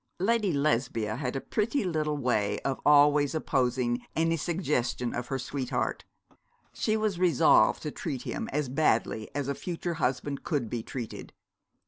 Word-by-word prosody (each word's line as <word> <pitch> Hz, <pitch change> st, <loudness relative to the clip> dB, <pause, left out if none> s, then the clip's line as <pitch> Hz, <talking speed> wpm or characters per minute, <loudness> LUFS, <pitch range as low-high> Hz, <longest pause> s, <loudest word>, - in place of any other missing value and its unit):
Lady 210 Hz, 0 st, +2 dB
Lesbia 120 Hz, -7 st, 0 dB
had 125 Hz, 0 st, -3 dB
a -, -, 0 dB
pretty 220 Hz, -, -1 dB
little 155 Hz, -4 st, -1 dB
way 120 Hz, -7 st, 0 dB
of 135 Hz, -1 st, -2 dB
always 145 Hz, 0 st, +5 dB
opposing 125 Hz, -4 st, 0 dB
any 165 Hz, +1 st, +2 dB
suggestion 150 Hz, -8 st, -1 dB
of 120 Hz, 0 st, -4 dB
her 135 Hz, -, -2 dB
sweetheart. 130 Hz, -1 st, -3 dB, 0.7 s
She 215 Hz, 0 st, 0 dB
was 215 Hz, -4 st, -1 dB
resolved 175 Hz, -7 st, +4 dB
to 150 Hz, -, -3 dB
treat 135 Hz, -6 st, -4 dB
him -, -, -4 dB
as 150 Hz, 0 st, -1 dB
badly 115 Hz, -5 st, +1 dB
as 145 Hz, -2 st, -1 dB
a 140 Hz, -, 0 dB
future 175 Hz, +3 st, -4 dB
husband 135 Hz, +2 st, -1 dB
could 145 Hz, -10 st, -2 dB
be 120 Hz, -, -2 dB
treated. 120 Hz, 0 st, -7 dB
140 Hz, 150 wpm, -28 LUFS, 125-165 Hz, 0.7 s, always